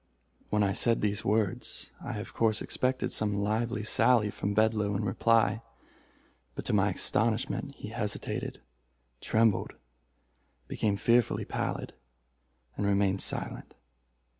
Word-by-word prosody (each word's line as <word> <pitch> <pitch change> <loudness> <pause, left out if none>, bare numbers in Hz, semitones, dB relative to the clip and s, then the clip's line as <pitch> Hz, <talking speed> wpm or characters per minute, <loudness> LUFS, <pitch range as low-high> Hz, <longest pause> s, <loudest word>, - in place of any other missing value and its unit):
When 105 0 +2
I 100 -1 +1
said 115 +3 +2
these 105 -1 0
words, 105 -2 -1
I - - -4
of - - -7
course 110 -2 +2
expected 130 0 -1
some 105 -1 +1
lively 110 +2 -1
sally 110 -1 +3
from 100 0 -3
Bedloe 105 -2 +2
in 105 +2 -1
reply, 115 +2 +2 0.9
but, - - -6
to - - -1
my - - +3
astonishment, 115 +5 0
he 105 - -8
hesitated, 105 - -3 0.6
trembled, 110 -2 +2 0.9
became 105 -2 -1
fearfully 115 +2 +2
pallid, - - -3 0.8
and 100 - -1
remained 100 -1 +2
silent. - - -1
105 Hz, 120 wpm, -29 LUFS, 100-115 Hz, 0.9 s, sally